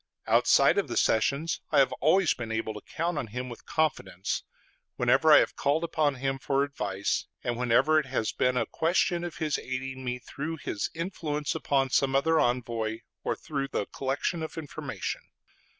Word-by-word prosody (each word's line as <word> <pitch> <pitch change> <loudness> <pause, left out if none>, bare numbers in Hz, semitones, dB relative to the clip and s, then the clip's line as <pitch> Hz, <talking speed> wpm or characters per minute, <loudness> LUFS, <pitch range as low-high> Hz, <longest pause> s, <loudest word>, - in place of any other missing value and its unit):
Outside - - +5
of - - -1
the - - -3
sessions 140 +8 +1
I 150 - +3
have 135 -1 +5
always 165 +4 +4
been 115 -3 -6
able 110 0 -2
to 105 - -8
count 170 -1 -2
on 130 - -4
him 125 +4 -5
with 120 - -11
confidence, 100 - -1 0.5
whenever - - +4
I - - +10
have - - +2
called 150 +4 +1
upon 155 -4 +1
him 135 +1 -2
for 135 +2 +1
advice, 100 -9 -2 0.2
and 120 - -1
whenever 125 +6 +3
it 150 - -4
has 130 -4 -1
been 125 0 +1
a - - +2
question 175 +1 +1
of 175 -2 -5
his 155 -2 0
aiding 130 +1 -5
me 125 0 -2
through 150 +6 -5
his 100 - -2
influence 160 -4 -2
upon 135 -2 0
some 135 0 +2
other 160 +4 +3
envoy 115 -2 0 0.2
or - - 0
through 140 -3 -3
the 105 - -2
collection 140 - -2
of 160 - -6
information. 155 -3 -5
135 Hz, 180 wpm, -28 LUFS, 125-155 Hz, 0.5 s, I